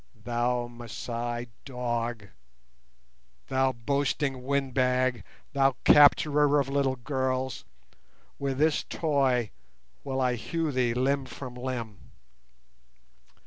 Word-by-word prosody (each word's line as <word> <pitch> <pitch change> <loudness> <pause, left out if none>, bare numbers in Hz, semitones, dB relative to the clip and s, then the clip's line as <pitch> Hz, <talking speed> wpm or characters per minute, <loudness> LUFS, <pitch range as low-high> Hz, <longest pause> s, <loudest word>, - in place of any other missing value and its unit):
"Thou 120 +2 -1
Masai 120 0 -5
dog, 120 -4 -3 1.2
thou 130 0 +2
boasting 135 +2 -1
windbag, 130 -2 +1 0.3
thou 135 -2 +3
capturer 145 0 +6
of 140 - 0
little 135 -1 +1
girls, 130 +1 -2 0.7
with 135 -1 -2
this 155 +1 +2
'toy' 135 -7 +1 0.5
will 135 -1 -2
I 125 -1 +2
hew 165 +5 -2
thee 125 -3 +1
limb 135 +2 +1
from 125 +1 -8
limb. 125 -5 -5
130 Hz, 95 wpm, -28 LUFS, 120-140 Hz, 1.2 s, capturer